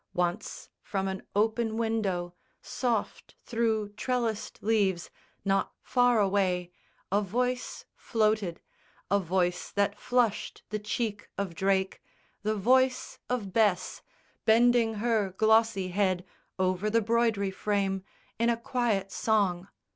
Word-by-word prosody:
Once, 180 +4 -2
from 195 -1 -2
an 190 0 -3
open 220 +1 +1
window, 200 -6 -1 0.3
soft 235 -5 -3
Through 225 -3 0
trellised 225 0 -2
leaves, 200 -5 +1 0.3
not 195 0 +1
far 245 -2 +3
away, 190 -3 +1 0.4
a 200 +1 +3
voice 245 +5 -2
Floated, 215 -6 0 0.5
a 200 - +4
voice 180 -1 0
that 205 0 0
flushed 245 -4 0
the 215 - -1
cheek 210 0 -3
of 200 -4 -2
Drake, 190 +2 0 0.4
The 215 +1 0
voice 255 +5 +2
of 220 -7 -2
Bess, 210 -5 +1 0.4
bending 230 0 +4
her 210 -4 0
glossy 220 -3 +3
head 185 -1 0 0.3
Over 185 +2 +1
the 230 +2 +3
broidery 225 -3 +1
frame, 195 -1 -1 0.4
in 235 +1 +3
a 235 - +2
quiet 230 -5 -1
song. 195 -5 +1
210 Hz, 115 wpm, -29 LUFS, 190-230 Hz, 0.5 s, a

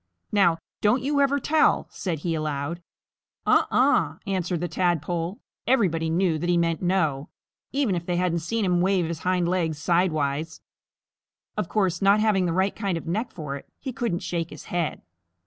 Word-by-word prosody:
"Now, 180 -5 +4 0.2
don't 230 +5 +3
you 285 +1 +2
ever 280 0 +3
tell," 310 +3 +3
said 165 -6 -3
he 170 - +1
aloud. 155 +1 -3 0.6
"Uh - - +4
uh!" - - +3
answered 185 -3 -1
the 175 - -1
Tadpole, 175 0 0
and - - -19 0.3
everybody 170 -11 +2
knew 165 -1 +1
that 175 - -2
he 175 - +3
meant 165 -1 +1
"No," 160 -6 0 0.4
even 270 -7 +1
if 170 -1 -3
they 175 - 0
hadn't 175 -1 +1
seen 205 +7 -1
him 180 -1 +2
wave 185 -1 +2
his 165 -1 -4
hindlegs 175 -3 0
sidewise. 155 -2 0 1.0
Of - - -2
course, 190 -5 0
not 200 +2 +5
having 205 -4 +2
the - - 0
right 190 +3 +1
kind 195 -5 -1
of - - -7
neck 215 +9 -2
for 150 -4 -5
it, - - -14
he 265 -2 -5
couldn't 230 -8 -2
shake 170 -2 -2
his - - -10
head. 175 -3 -1
175 Hz, 180 wpm, -25 LUFS, 165-195 Hz, 1.0 s, not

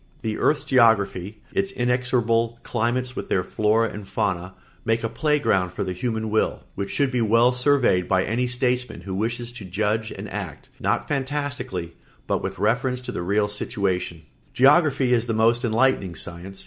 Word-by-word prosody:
The 110 -1 -2
earth's 150 - +2
geography, 105 -4 +2
its 195 0 0
inexorable 120 -4 +1
climates 125 +2 -1
with - - -5
their 90 - +1
flora 110 +3 +1
and 105 -1 -8
fauna, 95 -2 -2 0.3
make 115 +1 0
a - - +1
play 150 +6 +1
ground 95 -10 +1
for - - -2
the 95 -1 -3
human 110 +2 -2
will 110 - 0
which 100 0 -4
should 140 -2 +1
be 125 -2 0
well 115 +3 +4
surveyed 125 -8 +2
by 95 -1 +2
any 125 +3 0
statesman 125 -4 -1
who 95 +1 -6
wishes 120 +4 -2
to 120 -4 -9
judge 105 +4 -1
and - - -7
act, - - -7
not - - 0
fantastically, 140 - -3 0.3
but - - 0
with - - -4
reference 125 +5 0
to 125 - -6
the - - -4
real 100 +4 +1
situation. 95 -5 -2 0.3
Geography 135 -2 +4
is 120 0 +1
a - - +1
most 115 +3 +3
enlightening 115 -6 +1
science. 90 +4 -6
115 Hz, 175 wpm, -24 LUFS, 100-125 Hz, 0.3 s, well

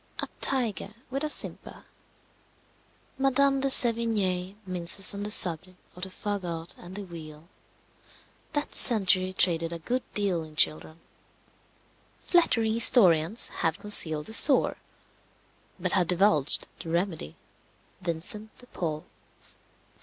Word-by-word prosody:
A - - -5
tiger 230 -5 -3 0.2
with 275 +3 -4
a 305 - -4
simper. - - +1 1.3
Madame 275 +1 0
de 275 - -2
Sevigné 215 -7 +3
minces 185 +1 +2
on 200 - -8
the 205 - -6
subject 185 -2 +3 0.2
of 180 - -15
the 190 - -7
fagot 180 -5 -7
and 180 +1 -14
the 205 - -7
wheel. 160 -3 -13 1.1
That 295 0 -4
century 185 -5 +4
traded 170 -3 -2
a 170 - -7
good 245 +10 -5
deal 195 -5 -2
in 155 -1 -13
children. 155 +1 -2 1.2
Flattering 230 -11 -1
historians 210 -5 +4
have 165 -1 -2
concealed 160 -7 0
the 220 - -7
sore, 275 +4 +4 1.0
but 180 0 -3
have 180 -4 0
divulged 170 -6 0
the 165 - -10
remedy, 170 - -5 0.7
Vincent 185 +5 -6
de 245 - -8
Paul. 155 -9 -7
185 Hz, 120 wpm, -24 LUFS, 170-220 Hz, 1.3 s, century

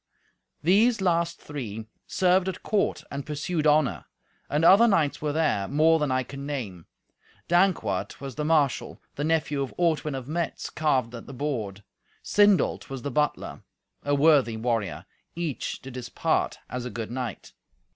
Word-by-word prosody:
These 215 +8 +4
last 170 -2 +1
three 115 -7 -6 0.2
served 185 0 +2
at 190 - -7
court 210 -2 0
and 140 0 -4
pursued 155 +2 -2
honour. 150 -2 +2 0.4
And 150 +3 +1
other 200 +7 +8
knights 165 -9 +1
were 150 -1 0
there, 145 -11 +1
more 160 +3 +4
than 150 -3 0
I 130 0 +1
can 140 +1 -8
name. 105 - -5 0.6
Dankwart 175 - +1
was 135 -1 -6
the 150 - -3
marshal; 150 -4 +1
the 145 - -4
nephew 155 -2 0
of 135 - -4
Ortwin 155 -4 +1
of 130 -1 -6
Metz 165 +2 -3
carved 130 -6 0
at 115 - -9
the 140 - -9
board; 110 -8 -3 0.4
Sindolt 205 -2 +3
was 135 -2 -6
the 145 - -3
butler, 150 +3 -1 0.4
a 145 0 +1
worthy 140 -6 +4
warrior: 115 -4 -2 0.3
each 165 -5 -3
did 130 -1 -9
his 125 -1 -6
part - - 0
as 125 -1 -5
a 125 - -4
good 115 -2 -5
knight. 125 -1 -5
145 Hz, 160 wpm, -26 LUFS, 125-165 Hz, 0.6 s, other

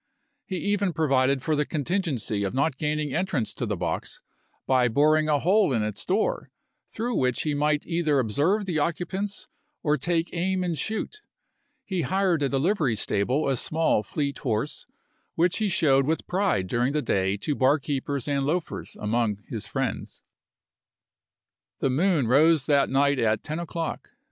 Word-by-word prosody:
He 190 - -3
even 200 -1 0
provided 135 -3 +2
for 155 - +1
the 150 - +2
contingency 150 - -1
of 100 +4 -2
not 140 0 0
gaining 150 -2 -1
entrance 170 - -1
to 120 - -3
the 105 -2 -2
box 85 0 -3 0.5
by 130 -2 +3
boring 155 +5 +3
a 150 - +4
hole 190 +4 +3
in 115 -3 +1
its 105 -1 -3
door, 200 +4 0 0.4
through 240 +2 -3
which 125 - 0
he 150 - -1
might 150 +1 +1
either 165 -4 +1
observe 145 - +1
the 170 -5 -1
occupants 185 +6 -3 0.4
or 150 -1 +1
take 165 +3 0
aim 185 +2 0
and 175 -2 -1
shoot. 220 - -3 0.6
He 185 -3 -2
hired 185 +1 +1
at 140 - 0
a - - +3
livery 155 - +1
stable 115 +8 0
a 135 - +2
small, 155 -2 +1
fleet 140 +6 -3
horse, 120 +2 -2 0.5
which 175 +4 +2
he 215 -2 +1
showed 135 -6 +3
with 160 +1 -1
pride 185 - 0
during 120 +7 0
the 150 -1 0
day 95 +1 0
to 145 +9 -2
barkeepers 140 0 0
and 140 -1 0
loafers 160 +4 -3
among 105 -2 -1
his 110 -2 -4
friends. 135 -1 -4 1.6
The 135 - +1
moon 155 -2 +2
rose 150 +4 +4
that 140 -2 +3
night 140 0 +2
at 110 -2 +1
ten 155 +1 -4
o'clock. 165 -1 -4
150 Hz, 165 wpm, -26 LUFS, 130-170 Hz, 1.6 s, a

